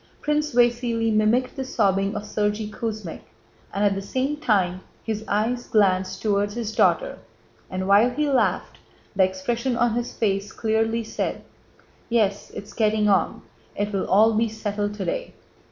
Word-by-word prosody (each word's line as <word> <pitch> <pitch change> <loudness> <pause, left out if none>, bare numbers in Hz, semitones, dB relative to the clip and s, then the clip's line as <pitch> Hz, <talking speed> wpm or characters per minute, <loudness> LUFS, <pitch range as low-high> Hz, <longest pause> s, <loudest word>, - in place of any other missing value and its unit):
Prince 300 -2 -1
Vasíli 235 -2 +2
mimicked 220 +4 +2
the 270 - -3
sobbing 200 -4 +1
of 205 - -3
Sergéy 210 0 -2
Kuzmích 215 -7 -5 0.5
and 200 +1 0
at 200 - +3
the 195 - -3
same 260 +8 -1
time 195 -11 +1 0.2
his 220 -1 -3
eyes 230 +4 0
glanced 190 -4 +1
toward 205 -1 +1
his 225 -2 -4
daughter, - - +2 0.5
and 185 0 -3
while 205 +5 +5
he 300 +4 -1
laughed 270 -3 0 0.4
the 190 - +2
expression 235 +7 -1
on 240 -1 +2
his 240 +1 -2
face 200 -2 0
clearly 225 +1 0
said: 220 - -3 0.7
"Yes... 210 -4 +1
it's 200 - -8
getting 215 -1 +2
on, 195 - +1 0.3
it 205 +1 -2
will 195 - -1
all 220 +4 +5
be 225 +1 +1
settled 205 -1 -3
today." - - -4
215 Hz, 155 wpm, -24 LUFS, 200-235 Hz, 0.7 s, while